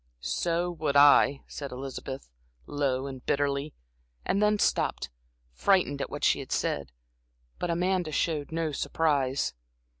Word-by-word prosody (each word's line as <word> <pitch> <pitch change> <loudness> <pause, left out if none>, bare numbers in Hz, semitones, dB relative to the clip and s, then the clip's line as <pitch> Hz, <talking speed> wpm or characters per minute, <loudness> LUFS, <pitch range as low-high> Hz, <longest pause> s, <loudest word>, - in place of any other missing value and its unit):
"So 170 - -1
would 155 -4 -2
I," 140 -1 +6
said 140 -2 -7
Elizabeth, 135 +1 -6 0.4
low 135 -2 -1
and 130 -2 -7
bitterly, 140 +1 -1 0.5
and 200 - +1
then 210 0 +3
stopped, 65 - 0 0.4
frightened 145 - +2
at - - -3
what - - -6
she - - +4
had - - -8
said. 70 -3 -1 0.7
But 175 - -2
Amanda 180 -1 0
showed 150 -2 -1
no 165 -1 -1
surprise. 140 - 0
145 Hz, 130 wpm, -28 LUFS, 135-170 Hz, 0.7 s, I